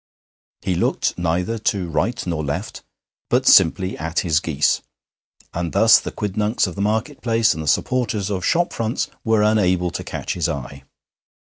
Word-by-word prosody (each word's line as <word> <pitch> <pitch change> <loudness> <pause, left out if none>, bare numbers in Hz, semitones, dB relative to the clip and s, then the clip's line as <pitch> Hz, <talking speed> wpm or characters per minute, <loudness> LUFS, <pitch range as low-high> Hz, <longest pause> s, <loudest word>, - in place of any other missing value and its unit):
He 95 - 0
looked 85 - 0
neither 90 +6 -1
to 100 -4 -1
right 115 +9 -1
nor 85 -3 -2
left, 70 0 -4 0.5
but - - +2
simply 95 +3 +5
at 80 +2 -1
his 80 -3 +2
geese, 75 -3 +1 0.7
and 85 -3 -3
thus - - +6
the - - -6
quidnuncs 105 +2 -1
of 90 - -5
the 100 - -5
market 110 +7 -1
place 115 -3 +2
and 80 - -6
the 80 - -6
supporters 110 - 0
of 95 -2 -2
shop 175 - +1
fronts 115 +1 -2
were 110 -2 +2
unable 90 -5 +2
to - - -5
catch - - -4
his - - -1
eye. 70 0 -6
95 Hz, 165 wpm, -21 LUFS, 85-110 Hz, 0.7 s, thus